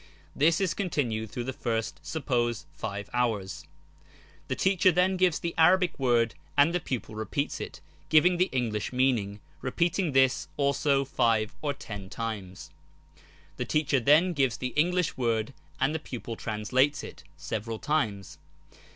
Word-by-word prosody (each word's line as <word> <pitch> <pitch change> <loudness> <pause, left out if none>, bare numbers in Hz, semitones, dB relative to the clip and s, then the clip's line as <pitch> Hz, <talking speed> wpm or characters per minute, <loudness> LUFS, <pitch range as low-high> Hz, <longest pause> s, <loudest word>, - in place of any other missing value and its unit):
This 160 +3 +3
is 190 -4 +1
continued 120 - -2
through 120 - -4
the 130 +2 -4
first, 115 -3 -2
suppose, 120 -7 -1
five 100 -1 -5
hours. 100 -10 -1 0.8
The - - -1
teacher 190 -1 +3
then 180 +2 +2
gives 180 -3 +3
the 170 0 -3
Arabic 175 0 +4
word 120 -3 +2 0.2
and 145 +4 +5
the 180 - +1
pupil 125 -8 -4
repeats 110 +7 -3
it, - - -7 0.3
giving 175 +3 +5
tlie 185 - +3
English 115 -5 -1
meaning, 120 -6 0 0.2
repeating 170 +4 0
this 130 -1 +3
also 140 -1 +2
five 115 -4 +1
or 145 -2 -1
ten 100 -6 -8
times. 105 -5 -6 0.9
The - - -2
teacher 150 -3 +1
then 155 +9 +4
gives 135 -6 +1
the 125 - -3
English 180 +2 +1
word 115 0 0 0.3
and 135 +3 +2
the 160 - -1
pupil 120 -5 -6
translates 125 +8 0
it, - - -10
several 110 +1 -4
times. 110 - -2
130 Hz, 145 wpm, -28 LUFS, 110-155 Hz, 0.9 s, and